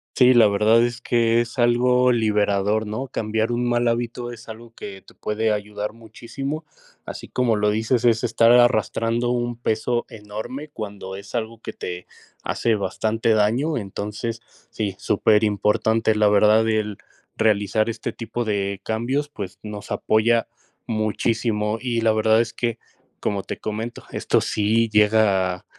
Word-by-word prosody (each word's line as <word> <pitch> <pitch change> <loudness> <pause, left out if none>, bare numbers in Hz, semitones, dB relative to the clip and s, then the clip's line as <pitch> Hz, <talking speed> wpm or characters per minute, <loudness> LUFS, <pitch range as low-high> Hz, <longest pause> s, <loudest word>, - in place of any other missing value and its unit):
Sí, 125 0 +6
la 120 -3 +6
verdad 110 +3 +4
es 120 0 -2
que 115 -1 +2
es 120 +3 -3
algo 125 +1 +4
liberador, 105 -2 +1
¿no?, 110 +6 -4
cambiar 110 -1 -1
un 120 0 0
mal 120 0 +1
hábito 120 +1 -2
es 115 -1 -13
algo 115 +1 -10
que 95 -1 -9
te - - -19
puede 110 +1 -1
ayudar 105 0 -4
muchísimo, 120 +7 -7 0.4
así - - -8
como 125 -3 +1
lo 105 0 +1
dices, 110 +3 0
es 115 -1 +3
estar 115 0 +4
arrastrando 120 0 +3
un 120 0 -1
peso 120 +1 -1
enorme 110 +7 -7
cuando 100 -6 -7
es 100 +5 -9
algo 115 -1 -4
que - - -6
te 90 0 -6 0.4
hace 115 -2 0
bastante 110 +3 -1
daño, 115 +9 +1
entonces 105 +2 -5 0.3
sí, 100 -4 -3
superimportante, 105 +1 +2
la 105 0 +3
verdad 105 +2 +4
el 105 -2 -1 0.4
realizar 110 0 +2
este 110 -1 -4
tipo 120 +1 -4
de 100 -3 -2
cambios, 130 +7 -1
pues 100 -10 -8
nos 105 -1 -8
apoya 115 +1 +2 0.4
muchísimo, 110 0 -1
y 120 -2 -1
la 110 0 +3
verdad 110 +1 +3
es 115 -1 -3
que, 115 -1 -2 0.4
como 100 -2 -1
te - - -6
comento, 110 +2 -5
esto - - +1
sí 110 +2 +1
llega 105 -4 +2
110 Hz, 150 wpm, -22 LUFS, 105-120 Hz, 0.4 s, Sí